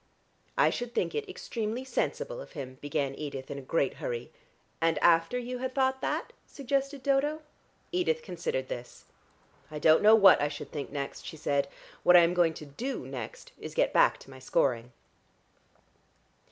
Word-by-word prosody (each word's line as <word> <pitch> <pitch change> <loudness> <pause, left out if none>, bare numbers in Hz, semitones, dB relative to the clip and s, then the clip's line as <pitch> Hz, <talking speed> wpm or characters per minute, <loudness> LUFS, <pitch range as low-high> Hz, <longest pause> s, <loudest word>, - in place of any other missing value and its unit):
"I - - +5
should 240 0 -5
think - - 0
it 440 -2 -3
extremely 230 - -4
sensible - - -2
of - - -12
him," 130 -4 -7
began 140 -1 -1
Edith 140 -2 -6
in 140 - -4
a - - -8
great 135 0 0
hurry. 120 0 -4 0.5
"And 165 -1 +2
after 165 +9 +4
you 250 0 -4
had 260 0 -4
thought 265 -1 +1
that!" - - -2
suggested 275 0 -2
Dodo. 290 +3 +1 0.5
Edith 415 +7 0
considered 485 +1 -3
this. - - -8 0.6
"I 155 - -6
don't 155 +1 +5
know 215 +1 +8
what 200 -8 +7
I 145 - +2
should 145 -1 -7
think 145 -3 -5
next," 140 -1 -5
she 160 - -8
said. 140 -2 0 0.3
"What 180 - +7
I'm 170 0 +5
going 170 -3 +3
to 150 - -8
do 230 - -5
next 130 -4 -7
is - - -7
to - - -17
get - - +2
back - - +5
to - - -14
my 130 - -11
scoring." 125 -2 0
175 Hz, 175 wpm, -29 LUFS, -, 0.6 s, know